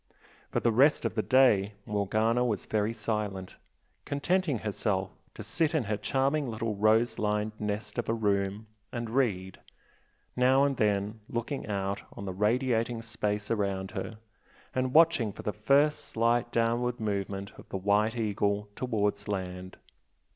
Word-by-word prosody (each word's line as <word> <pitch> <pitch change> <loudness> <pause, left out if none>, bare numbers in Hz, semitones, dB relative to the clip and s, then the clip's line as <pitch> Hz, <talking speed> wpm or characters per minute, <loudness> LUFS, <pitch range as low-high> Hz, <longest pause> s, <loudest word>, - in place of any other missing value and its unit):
For - - 0
the 120 - +2
rest 135 +4 +4
of 115 - 0
the 110 - 0
day 110 -6 +4
Morgana 110 +4 +1
was 110 -6 -1
very 105 0 0
silent, 105 -5 -3 0.5
contenting 155 +1 0
herself 100 -2 -1 0.2
to - - -7
sit 160 -1 0
in 150 - +2
her 105 0 -1
charming 135 +6 0
little 110 -1 -2
rose 110 +3 +3
lined 105 0 0
nest 105 +3 -3
of 115 - -3
a - - +2
room, 100 -1 0 0.3
and 120 -2 -4
read, 100 -8 0 0.8
now 130 +2 +4
and 140 -1 +2
then 105 +1 0
looking 120 +3 -3
out 100 -1 -2
on 100 - -7
the 95 - -4
radiating 115 +2 +1
space 105 -2 -2
around 100 -3 -1
her, 110 +1 -5 0.6
and 130 +1 -1
watching 160 -10 +5
for - - -10
the 105 - -2
first 140 +8 +3
slight 120 +1 +1
downward 120 +2 +1
movement 100 -2 -3
of - - -14
the - - -3
"White 105 +4 +2
Eagle" 105 -1 0
towards 105 -4 -1
land. 95 -2 -4
110 Hz, 150 wpm, -29 LUFS, 100-120 Hz, 0.8 s, watching